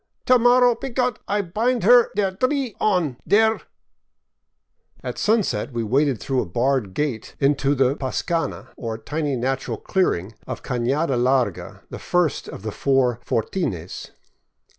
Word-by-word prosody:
To 255 -1 +5
mor 245 +1 +5
row, 245 -1 +5
py 270 - -6
Gott, 250 -2 -1
I 205 0 0
bind 225 +6 0
her 240 +3 +6
der 195 -2 +1
dree 255 +4 -1
on, 175 - +1
der.. 220 +2 +3 0.7
." - - -38
At - - -5
sunset 215 -9 +1
we 120 -1 -2
waded 135 +2 +1
through 135 -2 -1
a - - -4
barred 120 0 0
gate 140 -7 -3
into 140 0 +2
the 135 0 +2
pascana, 165 +5 -3
or 115 -2 -5
tiny 145 +4 -2
natural 130 +2 -2
clearing, 110 - -1
of - - -6
Canada 135 +4 0
Larga, 125 -5 0
the - - -6
first 175 -4 0
of - - -9
the 110 - -3
four 130 -1 +1
fortines. 105 - -3
145 Hz, 150 wpm, -22 LUFS, -, 0.7 s, her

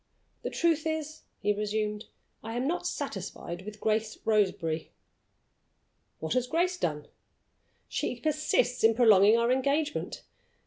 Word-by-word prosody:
"The - - -3
truth 325 -2 +1
is," 315 -1 -3 0.2
he 210 - +2
resumed, 210 +1 -2 0.4
"I 225 +1 -5
am 245 +2 -1
not 340 +5 -1
satisfied 175 +2 -5
with 210 +1 -9
Grace 215 0 0
Roseberry." 185 -7 +1 1.3
"What 160 - -2
has 250 0 +1
Grace 345 +6 +1
done?" 150 - -2 0.8
"She 245 - -2
persists 300 -3 +1
in 225 0 +6
prolonging 215 -2 +6
our 235 +1 +2
engagement. 280 +4 0
225 Hz, 125 wpm, -29 LUFS, 210-295 Hz, 1.3 s, in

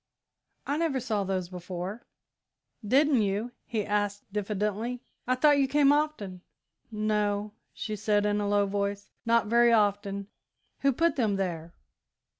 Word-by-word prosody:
I 285 - -1
never 315 -5 0
saw 220 -4 -1
those 190 -2 -2
before." 180 +4 -6 0.8
"Didn't 270 +3 +4
you?" 205 +4 -1 0.2
he 220 -4 -2
asked 205 -1 -1
diffidently; 210 +4 -2 0.2
"I 255 - +3
thought 290 +2 +4
you 275 - +3
came 285 0 +4
often." 290 -12 -1 0.5
"No," 210 -1 0 0.2
she 215 - -5
said, 210 0 +1
in 210 0 +1
a 205 - -1
low 205 0 +3
voice, 200 0 -3 0.2
"not 230 0 +4
very 235 +2 +4
often. 205 -2 +1 0.5
Who 275 - +3
put 330 +5 +1
them 220 -6 +2
there?" 170 -3 -3
210 Hz, 140 wpm, -28 LUFS, 200-245 Hz, 0.8 s, Didn't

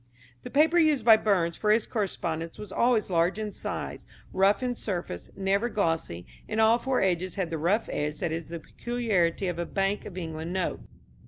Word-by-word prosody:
The - - -8
paper 320 +4 +4
used 300 -8 +3
by 225 -2 +9
Burns 185 -6 +1
for 210 - -1
his 215 +1 +4
correspondence 165 -6 -3
was 210 -2 -9
always 235 -4 +2
large 170 +3 +2
in 215 -1 -3
size, - - -5 0.3
rough 195 +5 +3
in 250 -1 0
surface, 175 - -5
never 195 +4 +1
glossy, 165 - -1 0.2
and 220 - -1
all 225 +2 +5
four 260 +1 0
edges 185 -1 0
had 185 -4 -2
the 160 - -2
rough 195 +8 +1
edge 150 +1 -2
that 175 -3 -1
is 165 -1 -4
the 170 0 -5
peculiarity 200 -3 -1
of 175 -1 -3
a 170 - -1
Bank 195 +1 -1
of 185 - -9
England 160 0 -5
note. 185 -2 -1
195 Hz, 190 wpm, -27 LUFS, 170-220 Hz, 0.3 s, by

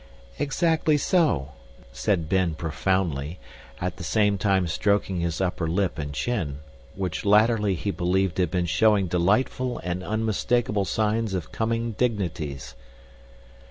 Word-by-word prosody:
"Exactly 155 +1 +2
so," 100 - +1 0.4
said 85 - 0
Ben 90 -2 +1
profoundly, 80 -1 -1 0.4
at - - -3
the - - -7
same 105 -2 +2
time 95 -2 +2
stroking 100 +1 0
his 85 -2 -2
upper 90 -3 -1
lip 90 0 0
and 70 -1 -4
chin, 80 - -2 0.4
which 90 -4 -3
latterly 105 -1 +4
he 100 +4 -2
believed 95 0 0
had 90 -3 +2
been 90 +1 0
showing 105 +2 +3
delightful 105 +8 +1
and 90 +1 -3
unmistakable 110 0 0
signs 110 0 0
of 85 -4 -4
coming 115 +1 -1
dignities. 80 - -2
95 Hz, 125 wpm, -25 LUFS, 85-110 Hz, 0.4 s, latterly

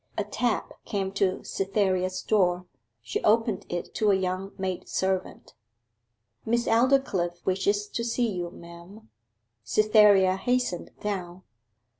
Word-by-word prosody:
A 210 - +1
tap 225 +3 -2
came 195 -3 -2
to 195 -1 0
Cytherea's 190 -2 -1
door. 180 -4 +2 0.4
She 115 -1 -3
opened 220 -2 +2
it 175 0 -4
to 215 - +1
a 200 - +5
young 190 +1 -2
maid 185 -1 -4
servant. 190 -1 -2 0.9
'Miss 235 +1 0
Aldclyffe 225 -8 +1
wishes 200 +2 +1
to 235 - -3
see 235 +1 0
you, 175 -2 -3
ma'am.' 170 - -13 0.5
Cytherea 205 - +5
hastened 245 -4 -1
down. 185 -3 -4
195 Hz, 120 wpm, -27 LUFS, 185-215 Hz, 0.9 s, a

